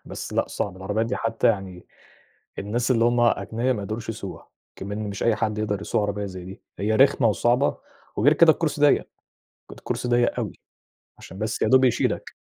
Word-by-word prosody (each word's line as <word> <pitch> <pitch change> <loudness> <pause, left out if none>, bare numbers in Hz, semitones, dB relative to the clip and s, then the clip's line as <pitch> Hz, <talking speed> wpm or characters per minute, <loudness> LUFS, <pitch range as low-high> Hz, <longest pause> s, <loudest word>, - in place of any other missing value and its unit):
بس - - -7
لأ، - - 0
صعب، 95 -3 -4
العربيات 105 +4 -2
دي 120 - -2
حتى 115 0 0
يعني 95 -5 -1 0.7
الناس 115 +5 -2
اللي 115 -2 +3
هُم 120 0 +2
أغنيا 120 +1 +1
ما 105 -5 -4
يقدروش 110 +3 -5
يسوقوها، 105 -4 -7 0.3
إكمن 105 +2 -5
مش 100 - -5
أي 115 -2 +2
حد 105 0 -1
يقدر 105 -2 -2
يسوق 105 - -1
عربية 105 0 -2
زي 95 -2 -8
دي. 95 +2 -11 0.2
هي 105 +2 0
رخمة 130 -2 +4
وصعبة 120 +6 +1 0.4
وغير 140 +8 +4
كده 160 +1 +6
الكرسي 150 -2 -2
ضيق، 145 0 +5 0.7
ك - - -10
الكرسي - - -4
ضيق 120 0 +2
أوي - - -3 0.7
عشان 95 - -11
بس 110 0 -3
يادوب 130 0 +5
يشيلك، 125 - 0
110 Hz, 185 wpm, -24 LUFS, 100-120 Hz, 0.7 s, كده